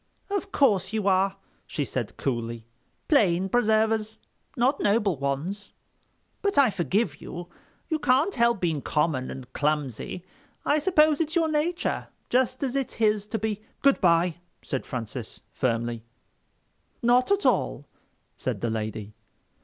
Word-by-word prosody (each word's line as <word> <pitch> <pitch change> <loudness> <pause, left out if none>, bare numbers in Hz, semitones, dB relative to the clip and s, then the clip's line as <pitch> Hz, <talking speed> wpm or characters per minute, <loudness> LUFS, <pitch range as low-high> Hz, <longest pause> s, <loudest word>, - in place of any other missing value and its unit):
"Of 400 0 -2
course 205 -8 +2
you 215 -2 0
are," 195 0 +3 0.3
she 145 - -2
said 125 -4 -4
coolly, 115 -3 -3 0.4
"plain 195 - +3
preservers. 220 -1 +2 0.4
Not 260 +4 +2
noble 205 -3 +2
ones. 145 +9 -3 0.7
But 400 0 0
I 270 -5 +6
forgive 180 - -1
you. 175 0 -7 0.4
You 315 -2 -1
can't 285 +8 +3
help 235 -3 +2
being 165 -5 0
common 150 -4 0
and 130 -1 -9
clumsy. 150 - -2 0.4
I 300 - +3
suppose 310 -2 +4
it's 315 +1 -2
your 330 -2 +3
nature—just 295 -5 -1
as 265 -1 -1
it's 275 -2 -2
his 210 -2 +1
to 220 - -2
be...." 215 -1 -2 0.2
"Good 275 -1 +4
bye," 170 -2 +3 0.3
said 135 - -4
Francis, 115 -1 -6
firmly. 115 -2 -1 1.0
"Not 245 +2 +4
at 400 0 +2
all," - - +1 0.5
said - - -3
the 115 - 0
lady. 110 -1 -4
200 Hz, 135 wpm, -26 LUFS, -, 1.0 s, I